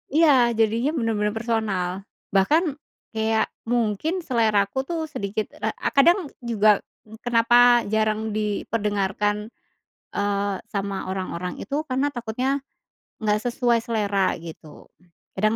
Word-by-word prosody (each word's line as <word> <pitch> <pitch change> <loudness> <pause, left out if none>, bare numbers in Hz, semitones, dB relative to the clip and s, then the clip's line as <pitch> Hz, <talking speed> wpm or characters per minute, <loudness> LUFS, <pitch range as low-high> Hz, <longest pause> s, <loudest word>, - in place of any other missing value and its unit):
Iya, 325 -1 +6 0.3
jadinya 225 +5 +2
benar-benar 215 -5 0
personal. 220 -6 -1 0.4
Bahkan 200 - +4 0.5
kayak 220 0 0 0.2
mungkin 245 - 0
selera 220 -6 +2
aku 200 +6 -4
tuh 335 -2 -2
sedikit 210 -6 -4
ra - - -1
eee, - - -2
kadang 335 +2 +4
juga 215 -4 +3 0.4
kenapa 240 0 +5
jarang 220 0 0
diperdengarkan, 210 0 -1 0.6
eee, 200 0 0
sama 195 -2 -3
orang-orang 180 -1 -4
itu, 280 - -4
karena 265 +3 +1
takutnya 250 +3 -2 0.6
nggak 210 0 +2
sesuai 240 -1 +2
selera 205 -4 0
gitu, 160 -2 -12 0.5
kadang 215 +3 +2
220 Hz, 110 wpm, -24 LUFS, 205-240 Hz, 0.6 s, Iya